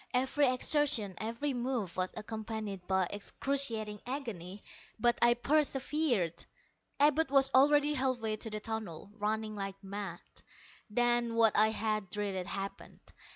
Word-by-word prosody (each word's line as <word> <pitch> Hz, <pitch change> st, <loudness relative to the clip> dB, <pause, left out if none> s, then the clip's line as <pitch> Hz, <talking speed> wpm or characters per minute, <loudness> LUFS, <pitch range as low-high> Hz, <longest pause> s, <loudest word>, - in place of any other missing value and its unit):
Every 265 Hz, +3 st, +3 dB
exertion, 255 Hz, -6 st, +1 dB
every 235 Hz, +6 st, -2 dB
move, 245 Hz, -7 st, -2 dB
was 185 Hz, 0 st, -1 dB
accompanied 215 Hz, -3 st, -5 dB
by 190 Hz, -1 st, +2 dB
excruciating 220 Hz, -1 st, -1 dB
agony, 210 Hz, -8 st, -5 dB, 0.4 s
but 240 Hz, +1 st, +3 dB
I 240 Hz, 0 st, +6 dB
persevered. 270 Hz, -, +1 dB, 0.6 s
Abud 295 Hz, +1 st, +4 dB
was 270 Hz, -1 st, +5 dB
already 290 Hz, +2 st, +5 dB
halfway 255 Hz, -5 st, 0 dB
to 225 Hz, -, -6 dB
the 215 Hz, 0 st, -4 dB
tunnel, 210 Hz, -5 st, -5 dB
running 215 Hz, 0 st, -2 dB
like 195 Hz, -1 st, -4 dB
mad. 195 Hz, -3 st, -5 dB, 0.7 s
Then, 240 Hz, +1 st, +1 dB
what 225 Hz, -2 st, +5 dB
I 215 Hz, +1 st, +6 dB
had 215 Hz, -3 st, -2 dB
dreaded, 195 Hz, -2 st, -3 dB
happened. 195 Hz, 0 st, -6 dB
220 Hz, 125 wpm, -32 LUFS, 205-265 Hz, 0.7 s, I